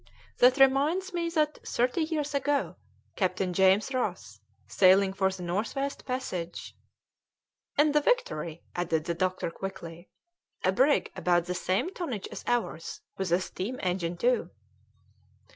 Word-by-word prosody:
That 250 Hz, +2 st, +6 dB
reminds 285 Hz, +8 st, +3 dB
me 340 Hz, -1 st, -1 dB
that 310 Hz, -2 st, 0 dB
thirty 250 Hz, +7 st, 0 dB
years 310 Hz, -2 st, -2 dB
ago 285 Hz, 0 st, 0 dB, 0.4 s
Captain 185 Hz, -1 st, 0 dB
James 190 Hz, +7 st, +3 dB
Ross, 255 Hz, -, -3 dB, 0.3 s
sailing 190 Hz, 0 st, +5 dB
for 190 Hz, -1 st, +1 dB
the 190 Hz, -1 st, -7 dB
North 195 Hz, +6 st, -2 dB
West 275 Hz, 0 st, -3 dB
passage 185 Hz, -10 st, -4 dB, 0.5 s
" -, -, -46 dB
"In 295 Hz, +1 st, +5 dB
the 300 Hz, 0 st, +3 dB
Victory," 170 Hz, -, -1 dB
added 165 Hz, -3 st, -1 dB
the 170 Hz, -, -1 dB
doctor 185 Hz, 0 st, -1 dB
quickly, 175 Hz, -2 st, -8 dB, 0.5 s
"a 185 Hz, -, +3 dB
brig 265 Hz, +9 st, +2 dB
about 175 Hz, -1 st, +2 dB
the 180 Hz, -, -2 dB
same 190 Hz, -, -1 dB
tonnage 260 Hz, -, -4 dB
as -, -, -7 dB
ours, 230 Hz, -9 st, -2 dB, 0.2 s
with 190 Hz, -3 st, -2 dB
a 175 Hz, -, +4 dB
steam 195 Hz, +7 st, -5 dB
engine 180 Hz, -2 st, -1 dB
too." 245 Hz, +7 st, +1 dB
195 Hz, 145 wpm, -28 LUFS, 180-280 Hz, 0.5 s, That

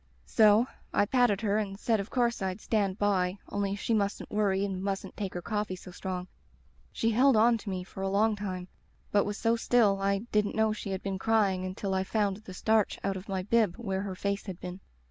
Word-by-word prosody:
"So 215 Hz, +1 st, +5 dB, 0.3 s
I -, -, +3 dB
patted 235 Hz, -3 st, +2 dB
her 210 Hz, -1 st, +1 dB
and 195 Hz, -2 st, -3 dB
said 225 Hz, -1 st, +1 dB
of 200 Hz, +2 st, -4 dB
course 240 Hz, -3 st, +1 dB
I'd 190 Hz, +1 st, -2 dB
'stand 200 Hz, -3 st, 0 dB
by,' 190 Hz, -2 st, +1 dB
only 200 Hz, -1 st, -1 dB
she 215 Hz, +3 st, -1 dB
mustn't 205 Hz, -1 st, -1 dB
worry 200 Hz, -2 st, +1 dB
and 190 Hz, -2 st, -3 dB
mustn't 195 Hz, 0 st, -3 dB
take 195 Hz, -3 st, -4 dB
her 175 Hz, -, -4 dB
coffee 210 Hz, -3 st, -2 dB
so 180 Hz, 0 st, -11 dB
strong. 180 Hz, 0 st, -5 dB, 0.6 s
She 230 Hz, -, 0 dB
held 260 Hz, +3 st, +5 dB
on 230 Hz, +1 st, +5 dB
to 205 Hz, -, -7 dB
me 185 Hz, -1 st, -3 dB
for 190 Hz, -, -9 dB
a 195 Hz, -, 0 dB
long 210 Hz, +2 st, +2 dB
time, 185 Hz, -3 st, -5 dB, 0.4 s
but 205 Hz, -, +3 dB
was 205 Hz, 0 st, -3 dB
so 230 Hz, 0 st, +2 dB
still 225 Hz, -4 st, +3 dB
I 200 Hz, +1 st, +1 dB
didn't 210 Hz, -1 st, +1 dB
know 220 Hz, -1 st, +2 dB
she 210 Hz, -, -6 dB
had 190 Hz, 0 st, -3 dB
been 195 Hz, -1 st, -3 dB
crying 200 Hz, -4 st, +2 dB
until 190 Hz, +1 st, -3 dB
I 190 Hz, 0 st, +1 dB
found 200 Hz, -1 st, 0 dB
the 210 Hz, -3 st, -11 dB
starch 220 Hz, +1 st, +2 dB
out 195 Hz, -1 st, 0 dB
of 190 Hz, +3 st, -8 dB
my 190 Hz, -1 st, -1 dB
bib 210 Hz, -3 st, +2 dB
where 195 Hz, -5 st, -2 dB
her 195 Hz, -2 st, -4 dB
face 200 Hz, +2 st, -2 dB
had 185 Hz, -2 st, -6 dB
been. 180 Hz, +1 st, -7 dB
200 Hz, 220 wpm, -29 LUFS, 190-215 Hz, 0.6 s, So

